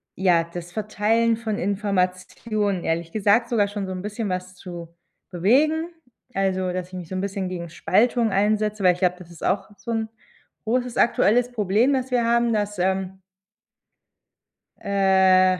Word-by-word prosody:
ja, 175 -3 +3
das 175 +1 -8
Verteilen 215 +3 +1
von 220 -2 -3
Informationen, 200 +1 -1
ehrlich 165 0 -1
gesagt, 215 +4 +2
sogar 215 -4 +2
schon 205 -1 -4
so - - -5
'n 185 -1 -5
bisschen 210 +1 -4
was 185 0 -4
zu 170 -2 -9 0.3
bewegen. 290 - +2 0.4
Also, 190 -2 0
dass 180 0 -4
ich 185 - -23
mich 180 -3 -7
so 185 - -5
'n 185 - -1
bisschen 195 -1 -3
gegen 175 -2 -5
Spaltung 225 +7 +2
einsetze, 210 +1 +1
weil 180 -2 +5
ich 175 - -10
glaube, 180 -1 +1
das 175 -2 -13
ist 170 -2 -13
auch 195 +2 0
so 235 - -6
'n 225 -1 -1 0.5
großes 245 +2 -1
aktuelles 240 +1 +3
Problem, 215 +3 +2
das 260 -1 -1
wir 245 -1 +2
haben, 235 0 +2
dass, 205 -2 -2
ähm 190 +1 -1 1.6
äh 190 -2 +4
200 Hz, 160 wpm, -23 LUFS, 185-225 Hz, 1.6 s, weil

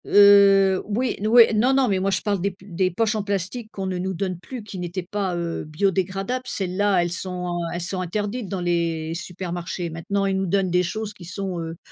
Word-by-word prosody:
Heu, 200 -1 +6
oui, 235 +5 0
n 210 - -1
oui. 235 +2 +9
Non 240 +5 +3
non, 270 -1 +3
mais 195 -3 +1
moi 195 +1 0
je 190 - 0
parle 200 -3 -1
des 200 - +1
p 190 +1 -18
des 185 0 0
poches 215 +5 0
en 215 - 0
plastique 205 +3 -3
qu'on 195 - -5
ne 185 -1 -2
nous 190 +1 -2
donne 185 0 -3
plus, 245 +4 -8
qui 200 -3 -8
n'étaient 175 +1 -4
pas, 195 -1 -2
heu, 170 -1 -3
biodégradables, 195 +8 -1
celles-là 195 0 +1
elles 175 - -2
sont, 180 -1 -3
heu, 170 - -2
elles 175 - -3
sont 185 +2 -2
interdites 205 +5 -3
dans 190 -3 -3
les 165 -2 -1
supermarchés. 175 0 -5
Maintenant 195 +5 -2
ils 195 -1 +1
nous 190 0 -1
donnent 190 0 +1
des 180 +1 +3
choses 215 +4 -3
qui 180 - -12
sont, 185 0 -4
heu, 165 0 -6
190 Hz, 225 wpm, -23 LUFS, 175-200 Hz, -, oui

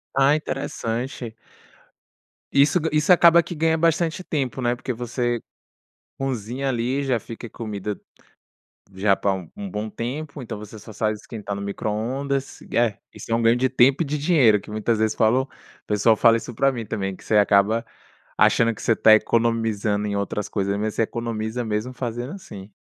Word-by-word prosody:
Ah, 135 +2 +5
interessante. 125 -4 -4 1.2
Isso 145 +5 +5
ga 160 - -2
isso 150 +4 +3
acaba 170 -1 +7
que 175 - -7
ganha 160 +1 +2
bastante 165 +2 +1
tempo, 135 -6 -2
né. 120 0 +1
Porque 125 +1 -4
você 120 0 -2 0.8
cozinha 130 0 -3
ali, 125 +3 -1
já 130 -4 +1
fica 115 +2 -9
comida 105 -3 -5 0.9
já 95 +1 +2
pra 100 - 0 0.2
um 200 -1 -6
bom 105 -6 -4
tempo. 140 +7 -5
Então 115 - -6
você 105 +1 -10
só 110 +2 -11
sabe 110 +1 0
esquentar 105 -1 -7
no 100 - -5
micro-ondas. 125 +7 -3
É, 115 -3 +2 0.2
isso - - -8
é - - +4
um 115 - +2
ganho 115 +1 +4
de 130 +1 +2
tempo 130 +4 +4
e 160 - -3
de 150 +1 -2
dinheiro, 140 - +4
que 105 - -13
muitas 110 +1 0
vezes 110 0 +1
falam 115 +4 +3
o - - -18 0.4
pessoal 105 +2 +3
fala 115 +1 +5
isso 115 +2 -6
pra 135 +5 +3
mim 120 -4 -5
também, 95 -2 -3
que - - -17
você 105 - +3
acaba 105 +3 +3 0.5
achando 115 -1 +4
que - - -11
você - - +3
está 110 0 +6
economizando 110 -2 +1
em 100 -1 -2
outras 100 0 -2
coisas, 100 -1 -1
mas 110 0 -2
você - - +1
economiza 115 +1 -3
mesmo 110 +3 -2
fazendo 120 +1 -4
assim. 105 - -10
115 Hz, 180 wpm, -23 LUFS, 105-135 Hz, 1.2 s, acaba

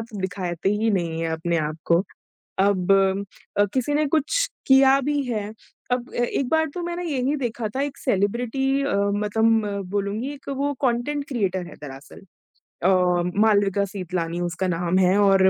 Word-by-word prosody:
त 225 -1 -8
दिखाते 180 -2 -2
ही 210 +3 +1
नहीं 170 -5 -1
हैं 165 - -1
अपने 165 +1 -1
आप 155 0 -2
को 170 +1 +4 0.6
अब 195 -1 +2 0.7
अ, 205 - +5
किसी 265 +2 0
ने 300 +1 +2
कुछ 320 - +1 0.2
किया 270 0 +6
भी 290 +1 0
है 215 -3 -1 0.5
अब 250 0 -1
ए 240 - +1 0.2
एक 270 - -1
बार 320 0 +3
तो 355 - -4
मैंने 345 +1 -3
यही 275 0 0
देखा 240 -5 -3
था 270 - 0
एक 285 -1 -3
सेलिब्रिटी 245 +5 0
अ, 280 - 0
मतलब 210 +3 +2 0.3
बोलूँगी 205 +6 -2
एक 280 -1 -11
वो 280 +1 -1
कॉन्टेंट 280 +3 -1
क्रिएटर 190 -8 -1
है - - -11
दरअसल। 135 +1 -10 0.6
अ, 180 - +4 0.5
मालविका 200 -2 +3
सीतलानी 180 -3 -4
उसका 175 +2 -2
नाम 175 +1 0
है 185 +1 +4
और 195 -1 +5
210 Hz, 165 wpm, -23 LUFS, 185-270 Hz, 0.7 s, किया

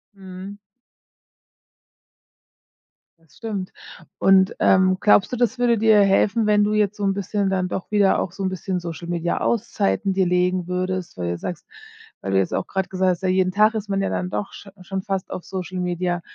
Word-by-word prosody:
Mhm. 190 +1 -9 2.6
Das 165 -2 -26
stimmt. 205 -5 -5 0.5
Und, 190 0 +4
ähm, 185 0 +4
glaubst 205 0 +4
du, 250 - -1
das 245 +1 +1
würde 240 -3 +2
dir 220 -1 +5
helfen, 205 +3 +2
wenn 210 -1 +4
du 210 +1 +1
jetzt 210 -1 +1
so 205 - -4
'n 195 - +2
bisschen 200 0 -1
dann 185 -1 0
doch 180 - -5
wieder 205 -2 +3
auch 170 - -2
so 195 +1 -6
'n 190 - +1
bisschen 185 0 -3
Social-Media-Auszeiten 175 +5 -1
dir 190 -1 +1
legen 180 0 +1
würdest, 180 - -3
weil 85 -1 -2
du 85 - -3
sagst 175 - -6 0.6
weil 95 - -4
du 95 - +2
jetzt 95 - -1
auch - - -1
grad 190 -1 -2
gesagt 185 0 +1
hast: 180 +2 -5
„Ja, 185 - +1
jeden 185 0 +2
Tag 215 +3 +4
ist 215 -1 -4
man 195 0 0
ja 195 - -1
dann 180 - -2
doch 200 - -4
sch 200 - -11
schon 190 +1 -4
fast 195 -3 -3
auf 180 - -5
Social 185 -1 -5
Media.“ 175 0 -1
190 Hz, 190 wpm, -22 LUFS, 180-205 Hz, 2.6 s, dir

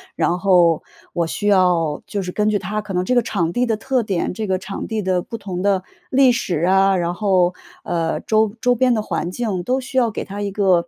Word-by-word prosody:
然 175 +1 0
后， 175 -4 +4 0.3
我 170 -1 -1
需 205 +5 -3
要 175 -6 +2
就 200 - -3
是 180 - -4
根 210 +3 +1
据 210 - +2
它 205 +2 -3
可 210 -2 -7
能 180 0 +1
这 250 - 0
个 245 - +4
场 175 -7 -1
地 245 +6 +1
的 225 -2 0
特 255 +3 0
点， 190 -3 -2
这 215 +2 -4
个 190 -1 +1
场 190 +1 -6
地 220 -1 -2
的 185 -2 0
不 230 - -7
同 185 -4 -5
的 195 -1 +1 0.3
历 265 -1 +5
史 180 -9 -1
啊， 195 +2 +4
然 175 -1 -1
后， 185 -2 +2 0.3
呃， 165 -1 -1
周 220 -1 +1
周 245 +1 +3
边 250 +1 +2
的 215 - 0
环 175 - -3
境， 200 -2 -2
都 260 +4 0
需 260 +1 -6
要 240 -3 +4
给 215 - -4
它 200 +1 -6
一 205 - -2
个 185 -4 +2
195 Hz, 255 characters per minute, -20 LUFS, 180-220 Hz, 0.3 s, 历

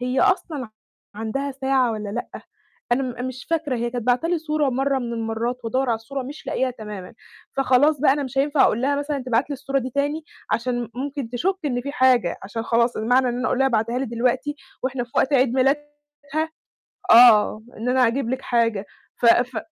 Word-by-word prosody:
هي 250 +1 0
أصلًا 350 -8 +1
ع - - -11 0.5
عندها 225 +6 -3
ساعة 265 -2 +1
والّا 210 -2 -5
لأ؟ 235 +4 -4 0.6
أنا 265 +3 +2
م 255 - -3
أنا 245 - -5
مش 255 +1 -8
فاكرة، 310 -6 0
هي 235 0 -2
كانت 240 -1 -4
باعتة 250 +6 +2
لي 345 -1 +1
صورة 305 -2 0
مرّة 270 +2 0
من 240 -2 -4
المرّات 230 +2 -3
وأدوَّر 255 +3 0
على 230 - +3
الصورة 265 +4 -6
مش 285 +4 -9
لاقياها 260 0 0
تمامًا. 210 -6 -8 0.4
فخلاص 270 +2 +3
بقى 290 - +5
أنا 290 +1 -1
مش 270 0 -4
هينفع 285 0 +3
أقول 235 - +2
لها 285 +2 +1
مثلًا 290 0 -2
تبعت 250 +4 +1
لي - - -1
الصورة 275 0 -2
دي 260 0 -4
تاني 290 +4 -1 0.3
عشان 240 -1 -1
ممكن 275 -1 -4
تشُك 360 +11 0
إن 245 -4 0
فيه 280 - -5
حاجة، 250 -9 +3
عشان 225 +4 -5
خلاص 235 +1 +2
المعنى 250 +4 +2
إن 245 0 -2
أنا 255 - -1
أقول 255 - 0
لها 270 - +4
ابعتيها 235 0 0
لي 265 - -1
دلوقتي 250 +5 -1 0.3
وإحنا 255 -1 -2
في 235 - -24
وقت 270 - +2
عيد 255 -2 +3
ميلادها 270 +3 +2 1.3
آه، 220 -2 +7
إن 235 +3 -2
أنا 255 -1 +4
أجيب 235 +1 -1
لكِ 260 +1 -2
حاجة. 230 -4 0 0.3
ف 240 - -2
ف 245 +1 +4
255 Hz, 205 wpm, -23 LUFS, 235-275 Hz, 1.3 s, آه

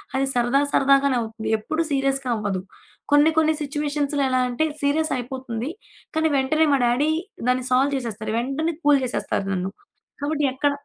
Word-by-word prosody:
అది 270 - +2
సరదా 245 +3 +2
సరదాగానే 275 -1 +4
అవుతుంది. 220 0 -5
ఎప్పుడు 310 +10 -2
సీరియస్‌గా 270 -1 0
అవ్వదు. 205 -4 -2 0.5
కొన్ని 295 +2 +6
కొన్ని 315 0 +4
సిచ్యువేషన్స్‌లో 290 -1 -1
ఎలా 255 0 +2
అంటే, 250 +6 0 0.2
సీరియస్ 310 +3 +1
అయిపోతుంది. 250 0 -5 0.4
కానీ 320 0 +2
వెంటనే 310 +4 +2
మా 275 - +3
డ్యాడీ 275 +6 +2 0.4
దాన్ని 255 0 +1
సాల్వ్ 270 +3 +3
చేసేస్తారు. 220 -3 -4
వెంటనే 290 +7 -2
కూల్ 290 -1 +6
చేసేస్తారు 205 -4 -2
నన్ను. 185 +1 -2 0.5
కాబట్టి 295 0 0
ఎక్కడ 290 +2 +1
270 Hz, 150 wpm, -23 LUFS, 240-295 Hz, 0.5 s, కొన్ని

